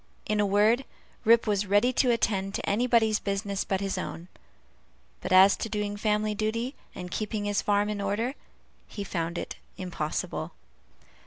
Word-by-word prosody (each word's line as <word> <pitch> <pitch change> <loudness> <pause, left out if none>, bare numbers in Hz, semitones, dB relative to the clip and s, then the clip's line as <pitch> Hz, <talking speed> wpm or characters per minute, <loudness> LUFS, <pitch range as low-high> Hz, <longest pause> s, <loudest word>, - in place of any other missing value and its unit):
In 215 0 0
a 205 - +3
word, 210 +6 +3 0.4
Rip 230 +1 +6
was 205 -2 0
ready 205 +6 +3
to 255 - +2
attend 200 -4 0
to - - -4
anybody's 225 0 +3
business 200 0 -2
but 190 0 -1
his 195 -1 -2
own; 175 -1 -6 0.9
but - - -5
as 190 +1 +7
to 225 - -4
doing 210 -1 -2
family 210 0 0
duty, 225 +5 -2 0.2
and 180 -1 -7
keeping 210 -1 -2
his 205 -1 +1
farm 205 0 +2
in 210 -1 -3
order, 210 +6 -1 0.5
he 205 - -6
found 170 -3 -3
it - - -5 0.2
impossible. 175 -4 -3
205 Hz, 160 wpm, -28 LUFS, 195-220 Hz, 0.9 s, as